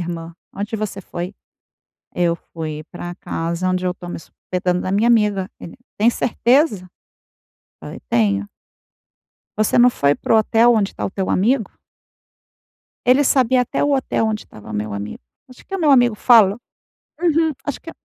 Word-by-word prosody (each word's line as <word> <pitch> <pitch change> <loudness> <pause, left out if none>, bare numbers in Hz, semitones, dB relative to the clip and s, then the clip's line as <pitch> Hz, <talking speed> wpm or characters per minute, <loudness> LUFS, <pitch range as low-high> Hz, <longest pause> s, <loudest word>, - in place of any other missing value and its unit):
irmã, 170 -1 -6 0.2
onde 205 +3 -4
você 210 -2 -4
foi?" 180 +1 -6 0.8
"Eu 170 -1 +1
fui 155 -3 -7
pra 175 0 -7
casa 170 +1 -3
onde 185 0 -1
eu 180 - +1
estou 175 -1 -9
me - - -5
hospedando, 180 +2 -3
na 185 - -3
minha 210 +4 +2
amiga". 210 -5 +2
Ele: 170 - -10 0.2
"Tem 220 +3 +4
certeza?", 235 - +1 0.9
falei: - - -8
"Tenho". 100 -3 +1 1.1
Você 215 - +2
não 245 +1 +6
foi 140 -8 +2
para - - -2
o 225 - +6
hotel 225 +2 +4
onde 210 -3 +1
está - - -5
o - - -2
teu 190 -1 -3
amigo? 220 +3 +1 1.4
Ele 260 +3 +5
sabia 255 -1 +3
até - - -2
o 290 0 +2
hotel 265 -4 0
onde 215 -1 -2
estava 105 0 -12
meu 105 0 -3
amigo. 100 +1 -6 0.3
Acho 255 - -16
que 390 - -7
o - - -1
meu 300 -3 +3
amigo 245 -4 +5
falou 215 -2 +5 0.6
Uhum, 325 -2 +2
acho 285 - -3
que 330 - -9
200 Hz, 165 wpm, -20 LUFS, 175-240 Hz, 1.4 s, não